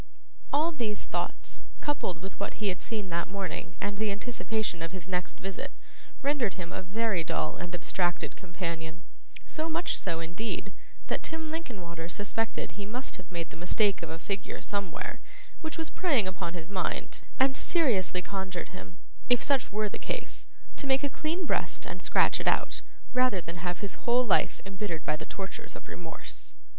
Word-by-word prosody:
All 310 +4 +5
these 230 -9 -1
thoughts, - - -2 0.2
coupled 185 - 0
with 190 - -6
what 200 - -1
he 210 -2 +1
had 185 - -1
seen 210 -5 -2
that 170 0 +1
morning 195 -1 -3
and 205 0 -1
the 215 -1 +3
anticipation 220 -3 0
of 165 0 -2
his 185 -2 -5
next 180 -1 -1
visit, 195 0 -3 0.5
rendered 275 -7 +3
him 175 -3 -4
a - - -1
very 195 -1 +2
dull 80 - +1
and 175 +1 -3
abstracted 175 0 +1
companion; 170 -2 -3 0.4
so 315 +1 -1
much 330 +2 +2
so, 170 -3 0
indeed, 185 +3 -2 0.3
that - - 0
Tim 320 0 -1
Linkinwater 180 - -4
suspected 210 +4 0
he 205 - -5
must 250 +5 -3
have 185 +1 -11
made 170 -2 -2
the - - -8
mistake 200 +2 +4
of - - -3
a 160 - -3
figure 195 +3 -2
somewhere, 200 -3 -2 0.4
which 315 -1 -2
was 320 -1 -2
preying 280 - +4
upon 180 -2 -2
his 165 -1 -4
mind, 190 -2 0 0.2
and 265 0 +6
seriously 205 - +3
conjured 190 -3 -2
him, 90 -1 -9 0.3
if 245 -1 +7
such 275 -3 +3
were 215 +1 +2
the - - -5
case, - - -3 0.3
to 285 - -2
make 265 +1 +5
a 285 - +2
clean 330 +6 0
breast - - +1
and - - -4
scratch - - +5
it - - -2
out, - - +3 0.3
rather 250 -6 +5
than 170 0 -5
have 175 0 -1
his 200 +3 -2
whole 250 +1 +6
life 210 - +4
embittered 195 -4 -2
by 155 - +3
the 155 0 -6
tortures 195 -1 -5
of - - -9
remorse. - - -5
195 Hz, 180 wpm, -31 LUFS, 175-245 Hz, 0.5 s, if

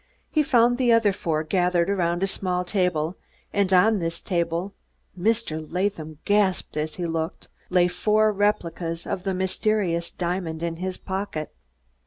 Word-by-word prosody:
He 310 - +3
found 245 -3 +3
the 245 -2 +4
other 225 -3 +4
four 160 -4 -1
gathered 175 +1 +2
around 175 -2 0
a - - +5
small 180 -2 -2
table, 180 -3 0 0.4
and 200 -2 +1
on 205 +3 +5
this 165 -1 -2
table 170 +1 -1 0.4
Mr. 190 -5 0
Latham 170 -4 -2
gasped 205 -5 +2
as 155 +1 -2
he 180 - -3
looked 165 0 -3 0.2
lay 180 -1 +4
four 215 +4 +2
replicas 170 -5 -1
of 185 - -3
the 190 0 -2
mysterious 185 -2 0
diamond 170 -2 -3
in 165 -1 -2
his 185 +1 -3
pocket. 190 -5 -4
180 Hz, 150 wpm, -25 LUFS, 170-200 Hz, 0.4 s, a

